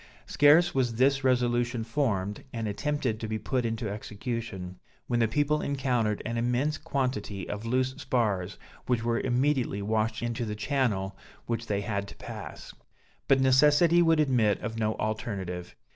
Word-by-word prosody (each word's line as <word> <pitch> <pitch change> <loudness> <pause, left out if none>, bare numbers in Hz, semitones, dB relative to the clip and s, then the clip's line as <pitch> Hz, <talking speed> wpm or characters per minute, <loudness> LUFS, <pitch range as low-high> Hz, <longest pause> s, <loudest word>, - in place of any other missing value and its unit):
Scarce 155 +5 +5
was 125 -4 +1
this 135 +3 +3
resolution 120 -2 +1
formed, 110 -5 -1
and 115 -2 -3
attempted 130 0 -1
to 110 - -4
be 110 0 -2
put 120 +3 -1
into 115 0 -3
execution, 105 -3 -5 0.3
when 120 - 0
the 115 - +3
people 145 +6 +1
encountered 125 -6 0
an 115 +1 -2
immense 125 +6 0
quantity 125 -10 -2
of 105 +2 -5
loose 130 +2 +1
spars, 105 -7 -1 0.3
which 120 -2 +1
were 115 0 +1
immediately 130 -3 +1
washed 110 +2 0
into 120 +1 -2
the 105 -2 -3
channel 105 -5 -1 0.3
which 115 0 -3
they 100 -1 0
had 100 -1 -2
to - - -11
pass; - - -9 0.5
but 135 - +5
necessity 150 +6 +5
would 165 -2 +4
admit 120 -8 +3
of 115 -2 -4
no 110 0 0
alternative. 95 -5 -4
120 Hz, 155 wpm, -28 LUFS, 105-130 Hz, 0.5 s, Scarce